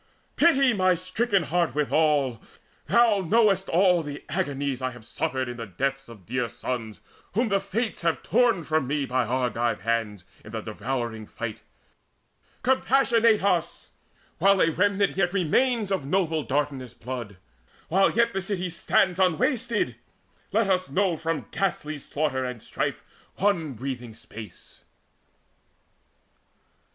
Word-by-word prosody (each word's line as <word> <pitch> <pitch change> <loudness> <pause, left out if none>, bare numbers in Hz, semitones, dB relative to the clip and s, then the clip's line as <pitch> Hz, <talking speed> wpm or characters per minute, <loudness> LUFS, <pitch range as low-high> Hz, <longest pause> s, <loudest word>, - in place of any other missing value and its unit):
Pity 275 -6 +4
my 185 -3 +3
stricken 190 +3 0
heart 170 -5 0
withal! 150 -5 +2 0.5
Thou 235 -4 +4
know'st 195 0 +3
All 180 -1 +4 0.3
agonies 140 -2 -2
I 130 - 0
have 120 -3 -12
suffered 130 +2 -2
in 120 0 -6
the 115 -2 -6
deaths 135 +7 -3
Of 105 -6 -13
dear 125 +1 -1
sons 110 -7 -5 0.3
whom 230 +4 +1
the 200 -1 +2
Fates 205 +4 -3
have 165 -1 0
torn 230 -6 +3
from 155 -3 0
me 145 0 0
By 125 -2 0
Argive 120 -4 0
hands 110 -4 -2 0.2
in 105 - -12
the 110 - -3
devouring 110 0 -4
fight. 115 -2 -6 1.0
Compassionate 240 -4 +3
us, 170 -4 0 0.5
while 195 +2 +5
a 165 - +4
remnant 200 +3 +1
yet 180 -2 +1
Remains 210 +4 +1
of 190 -6 0
noble 160 -2 +1
Dardanus' 135 -3 -2
blood, 120 -5 -6 0.5
while 195 +3 +4
yet 235 0 +2
This 195 0 -3
city 185 -3 -2
stands 180 +2 +1
unwasted! 190 - +1 0.5
Let 220 0 +2
us 185 -5 +1
know 185 +4 +1
From 160 0 -3
ghastly 155 -6 -2
slaughter 140 -2 -2
and 125 -3 -5
strife - - -3 0.3
one 175 -7 +1
breathing 120 -2 -6
space!" 110 -4 -12
160 Hz, 135 wpm, -26 LUFS, 125-195 Hz, 1.0 s, while